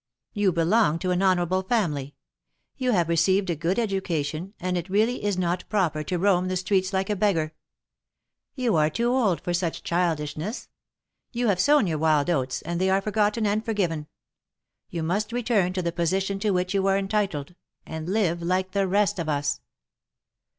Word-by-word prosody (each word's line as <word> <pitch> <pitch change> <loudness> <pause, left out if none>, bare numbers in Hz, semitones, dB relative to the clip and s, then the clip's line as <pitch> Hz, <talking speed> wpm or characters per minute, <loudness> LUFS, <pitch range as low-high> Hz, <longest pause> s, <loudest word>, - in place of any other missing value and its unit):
You 205 -2 +2
belong 170 +1 +2
to 180 +2 -2
an 180 +1 +1
honorable 185 -1 +2
family; 155 - -1 0.6
you 255 -2 -1
have 175 -7 +2
received 185 +3 +2
a - - -1
good 170 +5 -1
education, 185 -4 -2
and 180 0 -2
it 175 +1 -3
really 215 +5 +1
is 205 -2 0
not 180 0 -1
proper 180 -7 +1
to 180 - -1
roam 185 0 +2
the 185 0 -1
streets 185 0 0
like 190 +1 -1
a - - +1
beggar. 175 -6 +1 1.0
You 250 -7 +1
are 155 0 +3
too 235 +9 0
old 225 -9 +1
for 175 - -2
such 175 -2 -2
childish 165 -4 0
ness. 205 - -5 0.6
You 240 -1 0
have 190 -3 +1
sown 290 +3 +4
your 160 -4 -1
wild 155 0 +2
oats, 130 -5 -1
and 170 +1 -3
they 190 - +2
are 190 +1 +3
for 210 +2 -4
gotten 215 +1 +1
and 210 +1 +1
forgiven. 175 -9 -1 0.8
You 165 -2 -4
must 205 +6 -1
return 225 -6 +1
to 185 -1 -2
the 170 - -1
position 190 +3 -1
to 210 - 0
which 180 -1 0
you 195 -1 +1
are 195 0 +3
entitled, 195 -6 -1 0.3
and 160 +1 -6
live 185 -5 +1
like 185 +2 0
the 195 -1 +1
rest 200 -1 +1
of 165 -2 -2
us." 145 -1 -1
185 Hz, 185 wpm, -25 LUFS, 170-205 Hz, 1.0 s, sown